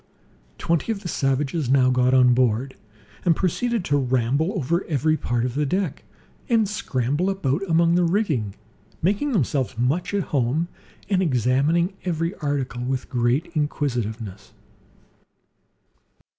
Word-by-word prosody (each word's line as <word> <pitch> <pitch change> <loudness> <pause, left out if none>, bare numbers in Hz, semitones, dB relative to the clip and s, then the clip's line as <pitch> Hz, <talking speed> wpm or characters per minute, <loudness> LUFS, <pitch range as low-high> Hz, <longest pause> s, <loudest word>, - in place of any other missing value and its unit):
Twenty 170 +5 0
of 205 -3 -4
the - - -4
savages 135 -1 -1
now 130 -1 +4
got 125 0 +3
on 125 -1 +5
board, 125 +1 +1 0.5
and 170 -3 +3
proceeded 215 +4 -1
to 145 0 +2
ramble 130 +6 +1
over 170 - 0
every 155 0 +1
part 120 -5 -1
of 125 - -2
the 150 +3 0
deck, 180 +2 -2 0.5
and 225 -3 +3
scramble 145 - -1
about 170 -5 -1
among 170 +1 +4
the 175 +1 +3
rigging, 160 - 0 0.5
making 205 - +1
themselves 140 - 0
much 135 +9 0
at 200 - +1
home, 140 +6 +1 0.4
and 195 -2 +1
examining 145 - +2
every 170 0 -1
article 135 -5 -2
with 130 +1 -3
great 125 +6 0
inquisitiveness. 120 - -3
145 Hz, 130 wpm, -23 LUFS, 125-175 Hz, 0.5 s, on